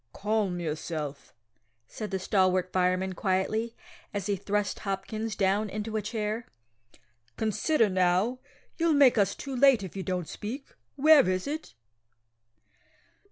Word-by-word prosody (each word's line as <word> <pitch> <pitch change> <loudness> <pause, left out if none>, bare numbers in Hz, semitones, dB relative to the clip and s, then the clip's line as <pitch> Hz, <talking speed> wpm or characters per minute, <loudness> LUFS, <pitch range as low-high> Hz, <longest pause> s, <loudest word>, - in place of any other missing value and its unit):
"Calm 205 -3 -1
yourself," 155 -3 -4 0.5
said 215 - -6
the 195 - -1
stalwart 185 -1 +1
fireman 185 +1 +1
quietly, 210 +5 -1 0.4
as 200 -2 -2
he 205 -1 0
thrust 205 +2 -2
Hopkins 215 +2 -3
down 200 +2 +1
into 215 +2 -4
a 215 - +1
chair. 215 +1 -3 0.9
"Consider 225 +4 +2
now. 185 +6 +1 0.4
You'll 330 -1 +2
make 265 -5 +6
us 200 -1 +2
too 275 -2 -6
late 260 -4 +5
if 190 - -8
you 195 - -3
don't 180 -3 -3
speak. 255 +7 -6 0.3
Where 290 -5 +6
is 185 0 -1
it?" 305 +2 -5
205 Hz, 130 wpm, -28 LUFS, 185-225 Hz, 0.9 s, make